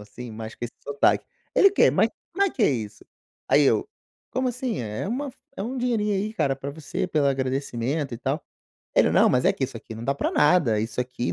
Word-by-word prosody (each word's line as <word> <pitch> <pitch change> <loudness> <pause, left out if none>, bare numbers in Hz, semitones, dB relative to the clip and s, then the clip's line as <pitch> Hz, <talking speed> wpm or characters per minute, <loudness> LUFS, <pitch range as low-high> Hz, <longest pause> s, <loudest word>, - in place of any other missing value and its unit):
assim, 110 +4 -9
mas 110 0 -7
com 120 - -6
esse 120 - -6
sotaque. 145 0 +2 0.3
Ele: 395 - +7
"Que, 400 - +5
mas - - +3 0.2
como 395 +3 +2
é 395 - +1
que 240 - -2
é - - +5
isso?", 110 -4 -4 0.4
aí 145 - +5
eu: 145 - +2 0.4
"Como 255 0 0
assim? 245 - -2
É 105 -2 -4
é - - -3
uma 275 +5 -2
f - - -22 0.2
é - - -3
um 250 +5 -4
dinheirinho 230 -4 0
aí, 205 +3 -1
cara, 135 -10 +1
pra 140 +1 -5
você, 160 +5 -4
pelo 150 -5 +1
agradecimento, 135 0 -1
e 115 - -7
tal". 135 +5 -2 0.5
Ele: - - +5
"Não, - - +5
mas 125 0 +2
é - - +5
que 135 - -2
isso 130 -2 -6
aqui 110 0 -9
não 115 +1 -7
dá 140 - +1
pra - - -1
nada, 150 -8 +4
isso 115 +3 -2
aqui 125 0 -3
e - - 0
140 Hz, 245 wpm, -25 LUFS, -, 0.5 s, Ele